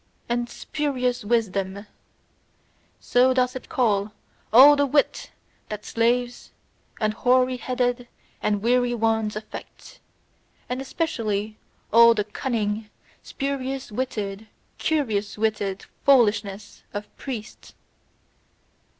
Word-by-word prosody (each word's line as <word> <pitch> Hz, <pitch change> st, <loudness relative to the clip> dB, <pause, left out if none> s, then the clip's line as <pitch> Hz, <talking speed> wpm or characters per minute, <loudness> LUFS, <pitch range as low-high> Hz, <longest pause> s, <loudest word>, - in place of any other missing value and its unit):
And 240 Hz, 0 st, -1 dB
spurious 255 Hz, -4 st, -2 dB
wisdom: 200 Hz, -3 st, -1 dB, 1.1 s
so 255 Hz, +1 st, +3 dB
doth 255 Hz, 0 st, +1 dB
it 260 Hz, -, -8 dB
call 210 Hz, -6 st, +1 dB, 0.4 s
all 270 Hz, +6 st, +9 dB
the 285 Hz, 0 st, +2 dB
wit 285 Hz, +1 st, +1 dB, 0.4 s
that 210 Hz, 0 st, -6 dB
slaves, 240 Hz, +1 st, 0 dB, 0.5 s
and 215 Hz, -1 st, +1 dB
hoary 255 Hz, +2 st, +2 dB
headed 245 Hz, -1 st, -1 dB, 0.3 s
and 205 Hz, -1 st, 0 dB
weary 245 Hz, +1 st, +2 dB
ones 220 Hz, -2 st, 0 dB
affect; 215 Hz, 0 st, -10 dB, 0.7 s
and 250 Hz, +1 st, -3 dB
especially 220 Hz, -8 st, -2 dB, 0.3 s
all 235 Hz, 0 st, +8 dB
the 210 Hz, -, 0 dB
cunning, 210 Hz, -1 st, -3 dB, 0.3 s
spurious 270 Hz, -2 st, -4 dB
witted, 210 Hz, -3 st, -4 dB, 0.3 s
curious 220 Hz, -11 st, -1 dB
witted 210 Hz, -3 st, -1 dB, 0.2 s
foolishness 210 Hz, -6 st, +2 dB
of 205 Hz, 0 st, -6 dB
priests! 245 Hz, -4 st, -8 dB
235 Hz, 100 wpm, -24 LUFS, 210-255 Hz, 1.1 s, all